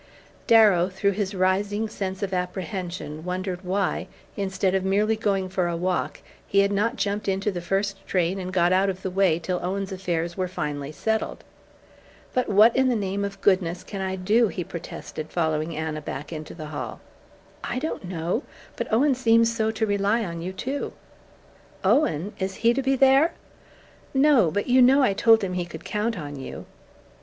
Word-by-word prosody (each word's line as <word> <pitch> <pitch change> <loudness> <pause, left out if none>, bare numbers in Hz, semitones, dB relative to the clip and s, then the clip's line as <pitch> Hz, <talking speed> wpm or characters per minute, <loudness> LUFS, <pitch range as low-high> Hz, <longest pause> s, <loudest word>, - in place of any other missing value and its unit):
Darrow, 205 -6 +6
through 200 +2 0
his 200 0 -2
rising 200 +3 +1
sense 195 -2 -4
of 195 -1 -2
apprehension, 180 -3 -4
wondered 180 0 -3
why, 190 +1 -1 0.3
instead 190 -1 0
of 190 -1 +1
merely 205 +3 +2
going 200 -4 0
for 185 -1 -1
a 170 -1 -2
walk, 180 +1 -2 0.3
he 200 - +4
had 200 0 +2
not 210 +4 +1
jumped 205 +1 -2
into 195 +2 0
the 175 -2 -5
first 195 +2 -1
train 180 +1 0
and 185 0 -5
got 180 -1 +3
out 190 +1 +3
of 190 0 -5
the 190 - -2
way 185 -3 +3
till 180 +2 -2
Owen's 195 +2 -3
affairs 175 -3 -2
were 185 -1 -1
finally 145 -5 -4
settled. 220 +7 -2 0.9
"But 255 - 0
what 215 +3 +6
in 265 0 +3
the 245 - +2
name 200 -1 -2
of 200 -1 -5
goodness 185 -2 +2
can 195 +1 -6
I 190 0 -2
do?" 210 +5 +3
he 185 -2 -4
protested, 160 -2 -7
following 160 -1 -1
Anna 155 -1 -3
back 145 +2 -6
into 155 -1 -7
the 155 -3 -7
hall. 130 -6 -5 0.6
"I 240 - -3
don't 275 -7 -3
know. 175 - -2 0.4
But - - -4
Owen 270 +6 +4
seems 230 -2 +3
so 220 -1 +1
to 220 0 0
rely 205 +2 +1
on 170 -2 -5
you, 180 +2 -4
too 265 +9 -4 0.5
" - - -28
"Owen! 200 - +2
Is 190 0 -2
HE 235 - +6
to 275 - 0
be 270 +1 +2
there?" 270 +5 +5 0.8
"No. 265 - +5
But 205 +5 -1
you 255 +1 +4
know 270 +3 +6
I 205 - +3
told 225 +2 +5
him 185 -1 -2
he 180 -1 -1
could 160 -2 -10
count 215 +1 -1
on 145 -3 -6
you." 135 - -7
195 Hz, 185 wpm, -25 LUFS, 180-215 Hz, 0.9 s, Darrow